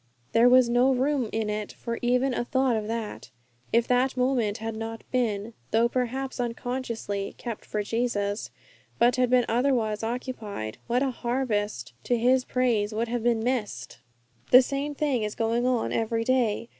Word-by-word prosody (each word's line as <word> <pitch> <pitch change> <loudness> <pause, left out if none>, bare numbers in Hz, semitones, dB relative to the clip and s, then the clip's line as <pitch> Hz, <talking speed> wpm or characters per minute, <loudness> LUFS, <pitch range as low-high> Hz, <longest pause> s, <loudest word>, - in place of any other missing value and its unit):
There 235 +2 +5
was 255 -1 +6
no 245 +3 +3
room 265 -2 +1
in 220 -1 -1
it 210 0 -3
for 235 -1 -5
even 250 +2 +2
a 240 - -1
thought 260 0 +1
of 215 -1 -2
that. 225 - -5 0.4
If 235 0 +3
that 255 +1 +2
moment 250 -5 +1
had 225 0 -4
not 225 0 -6
been, 230 -3 -1 0.2
though 230 +2 +3
perhaps 255 +2 -2
unconsciously, 235 -4 -3
'kept 235 -3 -6
for 210 -1 -2
Jesus,' 205 -2 -1 0.5
but 240 +1 +3
had 250 -1 +2
been 250 -1 +4
otherwise 230 -3 +1
occupied, 225 - -5
what 245 +3 +2
a 270 - 0
harvest 220 - -2
to 245 - +2
His 250 +2 +3
praise 230 -4 0
would 230 +1 -1
have 240 0 -1
been 230 -1 +1
missed! 210 - -3 0.5
The 255 +1 +8
same 280 +3 -3
thing 280 -5 0
is 210 0 -3
going 230 +2 +1
on 250 -3 0
every 225 0 0
day. 235 -2 +1
235 Hz, 170 wpm, -26 LUFS, 220-255 Hz, 0.5 s, The